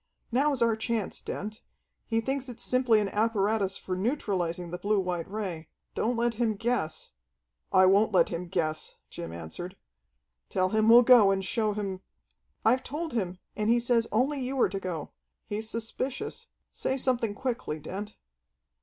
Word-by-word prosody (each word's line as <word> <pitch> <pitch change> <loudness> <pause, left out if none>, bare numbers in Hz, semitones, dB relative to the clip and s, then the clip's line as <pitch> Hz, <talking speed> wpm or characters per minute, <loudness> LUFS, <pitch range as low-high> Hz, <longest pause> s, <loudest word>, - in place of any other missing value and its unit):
"Now's 270 0 +2
our 230 -1 +3
chance, 220 -2 -2
Dent. 215 +3 -5 0.5
He 225 -1 +1
thinks 270 +2 -2
it's 240 0 -7
simply 250 -3 +3
an 200 - -1
apparatus 205 -2 +1
for 185 - -4
neutralizing 180 - -1
the 180 - -4
blue 205 0 +2
white 180 -3 -2
ray. 190 -7 -4 0.2
Don't 235 +2 0
let 235 0 +1
him 225 -1 0
guess 225 -7 -2 0.3
" - - -52
"I 185 0 +6
won't 200 +4 +5
let 180 -4 +4
him 175 +1 -4
guess," 160 -4 -2 0.2
Jim 85 -1 -6
answered. 85 - -7 0.7
"Tell 185 0 +1
him 215 +2 +3
we'll 240 +2 +9
go 235 -5 +7
and 195 -1 +1
show 215 +2 +1
him 195 -3 -4 0.3
" - - -44
"I've 250 +3 +4
told 305 +3 -4
him, 185 -6 -1 0.2
and 210 +1 0
he 240 +1 +5
says 235 -1 +2
only 270 +6 +1
you 260 +1 -2
are - - +4
to 195 +1 -3
go. 170 -6 -5 0.3
He's 215 +1 -3
suspicious. 255 - -4 0.2
Say 265 - -1
something 240 -5 0
quickly, 240 -11 -3
Dent." 200 +7 -6
215 Hz, 170 wpm, -28 LUFS, 185-240 Hz, 0.7 s, we'll